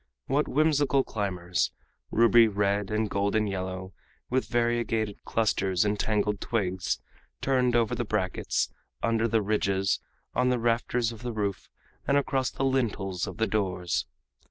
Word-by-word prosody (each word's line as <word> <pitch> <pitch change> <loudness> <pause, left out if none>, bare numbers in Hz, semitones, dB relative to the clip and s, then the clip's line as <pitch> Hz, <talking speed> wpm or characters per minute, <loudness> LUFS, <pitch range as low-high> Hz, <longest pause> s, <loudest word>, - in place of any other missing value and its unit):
What 145 +3 +1
whimsical 145 -2 +3
climbers 90 -6 -1 0.4
ruby 115 0 +6
red 100 -1 0
and 110 0 0
golden 100 +2 +1
yellow, 95 -1 -4 0.4
with 130 +1 +1
variegated 115 -3 0
clusters 95 -4 +1
and 105 0 0
tangled 105 -2 0
twigs 95 -6 -1 0.4
turned 125 -2 +2
over 115 -2 +2
the - - -1
brackets, 105 -5 -1 0.3
under 115 0 +2
the 110 -1 +2
ridges, 100 -2 +1 0.3
on 125 0 +2
the 125 - +2
rafters 120 0 +1
of 115 - -10
the 120 0 -3
roof, 100 -3 -3 0.4
and 140 - +4
across 135 -2 +1
the 135 - -2
lintels 105 -9 0
of - - -7
the 110 - +2
doors! 95 -5 -1
110 Hz, 140 wpm, -28 LUFS, 100-120 Hz, 0.4 s, ruby